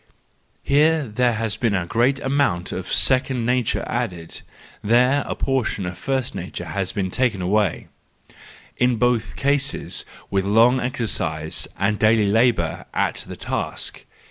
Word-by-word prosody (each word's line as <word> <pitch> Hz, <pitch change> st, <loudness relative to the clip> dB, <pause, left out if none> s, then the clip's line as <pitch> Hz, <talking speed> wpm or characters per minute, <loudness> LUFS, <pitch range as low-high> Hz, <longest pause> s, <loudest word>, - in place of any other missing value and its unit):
Here 150 Hz, +1 st, +3 dB
there 120 Hz, +3 st, +1 dB
has 110 Hz, -1 st, -2 dB
been 115 Hz, -4 st, +1 dB
a 90 Hz, -2 st, -1 dB
great 120 Hz, +8 st, +1 dB
amount 135 Hz, -10 st, 0 dB
of 95 Hz, -, -5 dB
second 130 Hz, -2 st, +3 dB
nature 125 Hz, -1 st, 0 dB
added, 90 Hz, -9 st, -4 dB, 0.4 s
there 125 Hz, +6 st, +3 dB
a -, -, -3 dB
portion 130 Hz, -7 st, -1 dB
of 90 Hz, 0 st, -5 dB
first 130 Hz, +7 st, -2 dB
nature -, -, -6 dB
has 95 Hz, -2 st, -2 dB
been 95 Hz, -4 st, -2 dB
taken 125 Hz, -4 st, 0 dB
away:—in 105 Hz, +5 st, -3 dB
both 115 Hz, -3 st, 0 dB
cases 140 Hz, 0 st, 0 dB, 0.3 s
with 95 Hz, -1 st, +1 dB
long 115 Hz, +6 st, +4 dB
exer¬ 125 Hz, -1 st, -2 dB
cise 80 Hz, -5 st, -1 dB
and 100 Hz, +1 st, 0 dB
daily 110 Hz, -2 st, +3 dB
labour 110 Hz, -7 st, +1 dB
at -, -, 0 dB
the -, -, -7 dB
task. -, -, -3 dB
115 Hz, 140 wpm, -22 LUFS, 100-130 Hz, 0.4 s, long